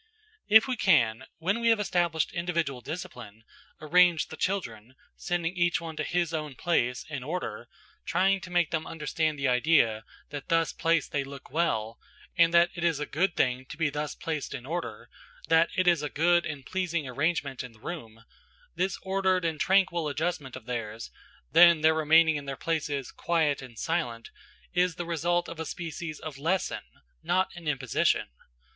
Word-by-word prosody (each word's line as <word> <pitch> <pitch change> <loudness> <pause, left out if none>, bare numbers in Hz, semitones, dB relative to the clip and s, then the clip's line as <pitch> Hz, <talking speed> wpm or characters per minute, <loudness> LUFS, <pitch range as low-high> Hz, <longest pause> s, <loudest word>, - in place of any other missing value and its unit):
If 220 +4 +7
we 255 -2 -2
can, 120 - +3
when 190 +7 0
we 235 - 0
have 225 -2 +4
established 175 -5 0
individual 170 -7 -2
discipline, 125 - -8 0.4
arrange 175 +1 +4
the - - -7
children, 130 - -3 0.2
sending 175 0 -2
each 175 -1 +2
one 165 -2 -7
to 155 - -1
his 170 0 -1
own 150 -3 -4
place, 125 -8 0
in 150 -4 -5
order, 175 +6 -4 0.4
trying 190 +2 +2
to 185 - -9
make 175 -3 +1
them 160 -1 -2
understand 155 0 -2
the 135 -1 0
idea 125 -4 +3 0.3
that 145 -1 -6
thus 165 0 +2
placed 165 0 +1
they 140 -1 0
look 135 -1 -11
well, 115 -9 -1 0.4
and 170 -2 +5
that 170 0 +5
it 170 - -5
is 165 -4 +2
a 150 - -2
good 175 +4 0
thing 125 0 +1
to 155 - -9
be 160 -3 +1
thus 150 +1 -4
placed 155 -4 -4
in 125 -2 -8
order, 165 -8 -5 0.4
that 165 +1 +5
it 185 -1 +2
is 170 -4 +4
a 150 - -3
good 175 +3 +2
and 145 -4 -7
pleasing 170 -5 -2
arrangement 140 0 -1
in 125 - -9
the 110 - -21
room, 115 -6 -8 0.5
this 190 +1 -1
ordered 190 -2 +1
and 160 -2 -1
tranquil 185 -4 +2
adjustment 150 -2 -3
of 130 -3 -10
theirs–then 115 - +2
their 160 +1 +5
remaining 160 0 +4
in 145 - -7
their 135 -1 -5
places, 150 -5 -2
quiet 160 -5 0
and 125 -3 -12
silent, 120 -9 -2 0.4
is 180 -1 +2
the 175 - -4
result 170 +1 0
of 165 - -8
a - - -2
species 165 -1 -6
of 150 -3 -8
lesson, 175 +5 -1 0.4
not 185 +1 0
an 175 -2 -9
imposition. 130 - +1
160 Hz, 175 wpm, -28 LUFS, 140-175 Hz, 0.5 s, If